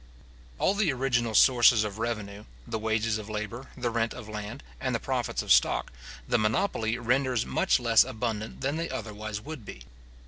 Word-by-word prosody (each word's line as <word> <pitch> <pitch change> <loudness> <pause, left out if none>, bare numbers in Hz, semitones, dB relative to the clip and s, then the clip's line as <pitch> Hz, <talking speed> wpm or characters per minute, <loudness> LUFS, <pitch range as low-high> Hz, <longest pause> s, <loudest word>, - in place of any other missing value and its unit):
All 195 - +2
the 200 -6 +2
original 125 -4 0
sources 120 -3 +6
of 105 0 -5
revenue, 105 -3 -4 0.2
the 110 - -3
wages 110 0 0
of 105 0 -9
labour, 110 +4 -5
the 120 -2 -1
rent 115 0 -1
of 125 -4 -9
land, 105 -5 -6 0.2
and - - -1
the - - 0
profits - - -2
of - - -2
stock, - - +3 0.3
the 120 - +2
monopoly 110 - 0
renders 125 0 +1
much 190 - +2
less 115 -2 +5
abundant 110 0 -4
than 140 +3 -1
they 165 +1 -3
otherwise 105 -1 -5
would 155 0 -8
be. - - -10
115 Hz, 175 wpm, -28 LUFS, 110-125 Hz, 0.3 s, sources